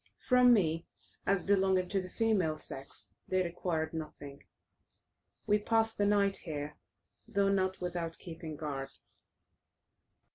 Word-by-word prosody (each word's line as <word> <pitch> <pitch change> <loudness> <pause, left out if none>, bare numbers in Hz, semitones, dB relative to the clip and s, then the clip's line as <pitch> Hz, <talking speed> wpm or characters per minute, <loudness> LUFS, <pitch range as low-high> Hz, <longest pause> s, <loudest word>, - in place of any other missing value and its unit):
From 250 -1 +6
me, 165 -7 +2 0.4
as 195 -2 +2
belonging 190 -2 +3
to 195 -1 +1
the 185 - -8
female 195 -10 +1
sex, 135 -9 -7
they 185 0 +2
required 170 -2 -2
nothing. 150 -3 -7 1.1
We 210 0 +4
passed 225 +1 +1
the 205 - +3
night 200 -1 +3
here, 150 -2 -4 0.5
though 200 0 +2
not 190 -1 +1
without 170 -2 -3
keeping 165 -2 -7
guard. 140 -3 -4
180 Hz, 120 wpm, -32 LUFS, 155-200 Hz, 1.1 s, From